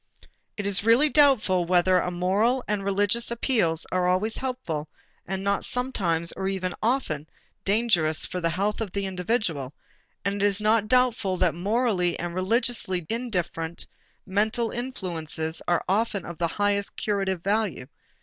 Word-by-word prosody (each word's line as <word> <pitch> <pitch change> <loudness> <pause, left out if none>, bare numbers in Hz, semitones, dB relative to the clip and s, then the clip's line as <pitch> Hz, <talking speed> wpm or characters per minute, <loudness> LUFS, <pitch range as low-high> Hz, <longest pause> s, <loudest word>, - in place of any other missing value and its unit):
It 205 - -3
is 200 -1 +2
really 235 +7 +5
doubtful 255 - +4
whether 180 +1 +3
the - - -2
moral 200 +8 +1
and 210 -1 -1
religious 205 +4 +1
appeals 220 - +1
are 180 -1 +1
always 190 +5 +1
helpful 175 - -4 0.4
and 190 +1 -3
not 200 0 0
sometimes 195 -11 0
or 190 - -4 0.3
often 225 - 0
even 155 - -21 0.4
dangerous 195 -7 +2
for 180 - -5
the 165 - +1
health 200 +6 -1
of 205 -5 -4
the 200 -1 -1
individual; 180 - -2 0.5
and 200 0 -1
it - - +3
is 200 0 0
not 215 0 +2
doubtful 240 -6 +2
that 175 -2 +2
morally 195 -1 0
and 175 0 -4
religiously 190 -2 0
indifferent 180 -8 -3 0.4
mental 215 +4 0
influences 170 -10 -3
are 175 -1 +1
often 200 0 0
of 170 -1 -8
the 170 - +2
highest 200 +2 0
curative 195 -4 -1
value. 200 -9 0
195 Hz, 150 wpm, -25 LUFS, 175-225 Hz, 0.5 s, really